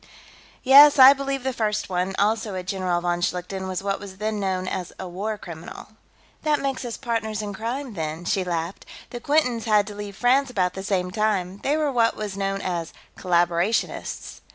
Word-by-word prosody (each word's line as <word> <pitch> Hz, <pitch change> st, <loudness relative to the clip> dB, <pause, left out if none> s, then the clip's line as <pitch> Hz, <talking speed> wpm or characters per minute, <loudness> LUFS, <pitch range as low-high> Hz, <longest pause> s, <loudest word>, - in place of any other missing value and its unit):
"Yes. 285 Hz, +3 st, +8 dB
I 265 Hz, +1 st, +10 dB
believe 275 Hz, -1 st, -3 dB
the 265 Hz, 0 st, -1 dB
first 215 Hz, -3 st, -1 dB
one, 185 Hz, +1 st, -2 dB
also 215 Hz, -1 st, 0 dB
a 185 Hz, -, -4 dB
General 185 Hz, -2 st, -1 dB
von 175 Hz, 0 st, -1 dB
Schlichten, 180 Hz, +2 st, -3 dB
was 185 Hz, 0 st, -4 dB
what 195 Hz, 0 st, -1 dB
was 195 Hz, -2 st, -10 dB
then 215 Hz, +1 st, -2 dB
known 185 Hz, -2 st, -1 dB
as 180 Hz, -1 st, -4 dB
a 190 Hz, -, -6 dB
war 205 Hz, +5 st, -4 dB
criminal." 170 Hz, 0 st, -10 dB, 0.5 s
"That 300 Hz, -2 st, +1 dB
makes 275 Hz, -1 st, -2 dB
us 240 Hz, -2 st, -5 dB
partners 220 Hz, -4 st, -2 dB
in 205 Hz, -1 st, -5 dB
crime, 240 Hz, +5 st, -4 dB
then," 160 Hz, -1 st, -4 dB
she 190 Hz, +1 st, +1 dB
laughed. 170 Hz, 0 st, -4 dB, 0.2 s
"The 240 Hz, -, -5 dB
Quintons 250 Hz, -4 st, +1 dB
had 210 Hz, -2 st, +3 dB
to 210 Hz, -, -8 dB
leave 205 Hz, -1 st, -7 dB
France 260 Hz, +3 st, +3 dB
about 185 Hz, -7 st, 0 dB
the 190 Hz, -, -6 dB
same 185 Hz, -2 st, -1 dB
time; 195 Hz, -2 st, -1 dB
they 290 Hz, +3 st, +1 dB
were 300 Hz, -2 st, 0 dB
what 230 Hz, -3 st, +2 dB
was 210 Hz, -2 st, -5 dB
known 195 Hz, 0 st, -2 dB
as 170 Hz, -3 st, -3 dB, 0.2 s
collaborationists." 175 Hz, +3 st, -1 dB
205 Hz, 190 wpm, -24 LUFS, 185-235 Hz, 0.5 s, I